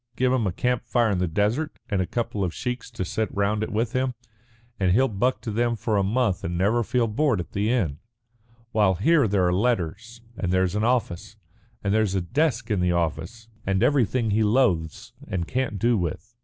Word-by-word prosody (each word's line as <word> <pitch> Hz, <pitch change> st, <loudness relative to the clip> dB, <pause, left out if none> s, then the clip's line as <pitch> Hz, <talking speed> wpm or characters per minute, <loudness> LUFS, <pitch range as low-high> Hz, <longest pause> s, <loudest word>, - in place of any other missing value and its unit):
Give 130 Hz, 0 st, +2 dB
him 120 Hz, -5 st, +1 dB
a -, -, 0 dB
camp 125 Hz, +7 st, -1 dB
fire 120 Hz, -2 st, +2 dB
in 95 Hz, -, 0 dB
the 90 Hz, -, +1 dB
desert, 110 Hz, -, -1 dB
and 100 Hz, -3 st, 0 dB
a 90 Hz, -, -2 dB
couple 115 Hz, -4 st, -2 dB
of 90 Hz, -3 st, -2 dB
sheiks 125 Hz, +1 st, -4 dB
to 115 Hz, -6 st, -4 dB
sit 110 Hz, +4 st, -2 dB
round 100 Hz, +1 st, 0 dB
it 110 Hz, -, -3 dB
with 115 Hz, +3 st, -1 dB
him, 130 Hz, -1 st, 0 dB, 0.6 s
and 95 Hz, -2 st, +3 dB
he'll 130 Hz, +6 st, +4 dB
buck 125 Hz, +4 st, 0 dB
to 110 Hz, -, -4 dB
them 120 Hz, +2 st, +1 dB
for 110 Hz, 0 st, -1 dB
a 100 Hz, -, +3 dB
month 105 Hz, -1 st, 0 dB
and 85 Hz, +1 st, -3 dB
never 105 Hz, +6 st, +2 dB
feel 120 Hz, +2 st, +1 dB
bored 125 Hz, 0 st, +1 dB
at 85 Hz, -, -6 dB
the 105 Hz, +2 st, 0 dB
end. 90 Hz, -, 0 dB, 0.7 s
While 105 Hz, -5 st, +3 dB
here 140 Hz, -, +3 dB
there 100 Hz, -2 st, +2 dB
are 90 Hz, -, +2 dB
letters, 115 Hz, +2 st, -1 dB
and 90 Hz, -4 st, -2 dB
there's 95 Hz, -1 st, +2 dB
an 105 Hz, +1 st, 0 dB
office, 115 Hz, -5 st, -1 dB, 0.5 s
and 100 Hz, 0 st, 0 dB
there's 110 Hz, -3 st, +1 dB
a 95 Hz, -, +1 dB
desk 120 Hz, -, 0 dB
in 105 Hz, -, +1 dB
the 90 Hz, 0 st, +2 dB
office 85 Hz, -, -2 dB, 0.2 s
and 95 Hz, +2 st, 0 dB
everything 125 Hz, -4 st, +2 dB
he 110 Hz, +2 st, +2 dB
loathes 105 Hz, -, +1 dB
and 85 Hz, -2 st, -3 dB
can't 125 Hz, -5 st, -2 dB
do 115 Hz, +2 st, +2 dB
with. 90 Hz, +7 st, -4 dB
110 Hz, 210 wpm, -25 LUFS, 95-120 Hz, 0.7 s, he'll